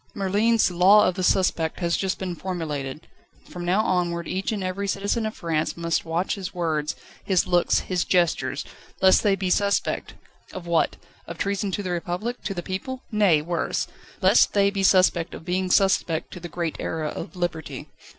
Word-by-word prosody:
Merlin's 205 +1 +2
"Law 190 +4 +6
of 185 - +1
the 185 - -4
Suspect" 180 -3 +1
has 170 -2 +1
just 190 -1 -1
been 185 -2 -4
formulated. 155 -7 -4 0.4
From 175 - -7
now 185 +5 +2
onward 175 -3 0
each 190 +4 -2
and 205 -3 -3
every 190 +2 -3
citizen 200 +3 -1
of 215 - -6
France 160 -1 -2
must 170 -1 -1
watch 165 +3 -1
his 190 -2 -6
words, 155 -3 -1 0.3
his 190 -3 +2
looks, 175 -2 +2
his 180 -2 -1
gestures, 175 -2 +1 0.3
lest 190 0 +5
they 200 -2 +3
be 190 -1 -2
suspect. 200 +1 0 0.4
Of 185 -2 -7
what 170 -1 +1 0.3
of 170 - -7
treason 200 +1 -1
to 205 - -2
the 185 - -3
Republic, 180 +8 -3
to 195 - -2
the 175 - -4
people? 250 +9 -5
Nay, 195 -8 +3
worse! 170 +1 -1 0.3
lest - - +5
they 200 -1 +3
be 200 -1 -2
suspect 185 -3 +3
of - - -11
being 185 +1 -1
suspect 180 -4 +2
to 180 - -8
the 175 0 -8
great 165 -1 -3
era 155 -2 -2
of 155 - -7
Liberty. 175 -3 -4
180 Hz, 180 wpm, -24 LUFS, 170-195 Hz, 0.4 s, Law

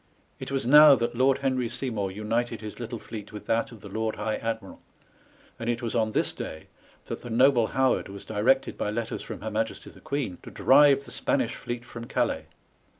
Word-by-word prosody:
It - - -6
was 135 -2 -1
now 150 +2 +9
that 120 -1 -1
Lord 130 +2 +3
Henry 130 -3 0
Seymour 120 -5 -2
united 110 +3 -2
his 105 +1 -8
little 120 0 -5
fleet 110 -1 -9
with 105 - -9
that 115 +3 0
of 115 -4 -13
the 100 - -9
Lord 110 +2 -2
High 110 +1 -2
Admiral; 115 -3 -5 0.8
and 115 - -3
it 120 +1 -1
was 115 - -2
on 110 -2 +1
this - - +1
day 80 0 -7 0.4
that - - -6
the 120 - -8
noble 120 0 +4
Howard 130 -3 +1
was 100 0 -9
directed 120 +6 +1
by - - -1
letters 110 +1 -3
from - - -8
her - - -4
Majesty - - -3
the - - -17
Queen 135 -11 -3
to - - -10
drive 140 0 +5
the 125 - -12
Spanish 125 -1 0
fleet 120 0 -6
from 115 -1 -8
Calais. 120 -11 -1
115 Hz, 205 wpm, -27 LUFS, 110-130 Hz, 0.8 s, now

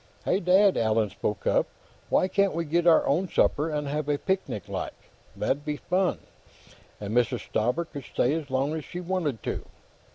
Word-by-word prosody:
"Hey, 185 - +2
Dad!" 190 +2 +4
Allan 110 -2 +2
spoke 105 -1 -3
up. - - +3 0.4
"Why - - +3
can't 195 -1 +1
we 170 0 -1
get 170 +3 +1
our 165 - +6
own 175 +7 +1
supper, 150 +1 +2
and 150 -2 -2
have 150 +1 -2
a 145 - +2
picnic, 190 - -2
like? - - -4 0.4
That'd 140 +2 -1
be 150 -1 -3
fun, 185 +3 0 0.8
and 105 +2 -4
Mrs. 120 -1 +2
Stauber 125 +10 0
could 140 -5 -9
stay 125 - +1
as 155 -3 -3
long 135 +3 0
as 160 -1 -3
she 175 - -7
wanted 175 -9 -2
to." - - -3
150 Hz, 185 wpm, -27 LUFS, 130-180 Hz, 0.8 s, our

